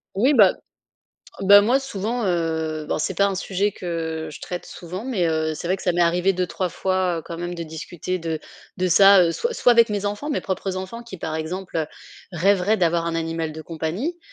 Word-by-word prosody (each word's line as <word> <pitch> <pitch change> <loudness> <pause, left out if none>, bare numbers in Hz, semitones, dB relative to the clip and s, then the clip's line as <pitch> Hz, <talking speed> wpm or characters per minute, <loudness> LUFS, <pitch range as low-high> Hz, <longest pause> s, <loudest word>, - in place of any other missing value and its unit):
Oui 255 +9 +3
bah, 205 -7 +6 0.9
bah, 200 +1 +8
moi 255 +6 +3
souvent, 235 -1 -3
heu, 160 -3 -1
ben - - -1
c'est 155 - -2
pas 200 - +4
un 195 - -2
sujet 195 +1 -1
que 160 -2 -4
je - - -10
traite 180 -1 -5
souvent 180 +7 -7
mais, 195 -10 0
heu, 160 -1 0
c'est 165 - -6
vrai 190 0 +1
que - - -10
ça 180 - +1
m'est 175 0 +2
arrivé 180 +3 +2
2-3 180 0 -2
fois 180 -2 -1
quand 170 0 -7
même 175 0 -4
de 170 - -5
discuter 170 +3 -5
de 165 -2 -3 0.4
de 185 0 0
ça, 195 +1 +7
heu, 165 -1 +2
soit 475 - -2
soit 245 - +4
avec 235 0 +5
mes 205 -1 -2
enfants, 205 +9 -3
mes 290 - -1
propres 190 0 -3
enfants 190 +6 -6
qui, 235 -5 -9
par 160 -1 -4
exemple, 170 +2 -4
heu, 155 - -1 0.5
rêveraient 195 +4 +2
d'avoir 170 -2 +1
un 165 - -2
animal 165 -1 -2
de 160 0 -8
compagnie. 175 - -3
180 Hz, 215 wpm, -23 LUFS, 165-200 Hz, 0.9 s, bah